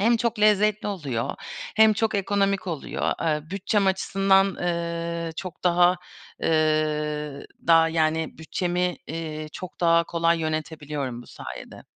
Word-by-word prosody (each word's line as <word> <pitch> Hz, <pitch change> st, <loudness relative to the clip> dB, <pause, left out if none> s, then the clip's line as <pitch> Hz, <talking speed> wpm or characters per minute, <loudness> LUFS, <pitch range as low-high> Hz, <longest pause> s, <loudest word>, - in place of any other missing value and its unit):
Hem 230 Hz, +3 st, +4 dB
çok 235 Hz, -1 st, -1 dB
lezzetli 210 Hz, 0 st, +3 dB
oluyor 140 Hz, -, -3 dB, 0.4 s
hem 220 Hz, 0 st, +7 dB
çok 220 Hz, +1 st, 0 dB
ekonomik 200 Hz, -1 st, +1 dB
oluyor. 165 Hz, -5 st, -2 dB
Eee, 155 Hz, -1 st, -1 dB
bütçem 200 Hz, +1 st, +1 dB
açısından, 195 Hz, 0 st, +3 dB
ııı, 170 Hz, -2 st, -3 dB
çok 185 Hz, -2 st, -7 dB
daha, 180 Hz, +1 st, +5 dB, 0.5 s
ııı, 150 Hz, -2 st, 0 dB, 0.2 s
daha, 165 Hz, 0 st, +6 dB
yani, 160 Hz, 0 st, 0 dB
bütçemi, 180 Hz, +2 st, -1 dB
iii, 155 Hz, -1 st, -5 dB
çok 185 Hz, -1 st, -9 dB
daha 170 Hz, -1 st, +4 dB
kolay 170 Hz, 0 st, +1 dB
yönetebiliyorum 150 Hz, -5 st, -3 dB
bu -, -, -17 dB
sayede. -, -, -9 dB
170 Hz, 125 wpm, -25 LUFS, 155-195 Hz, 0.5 s, hem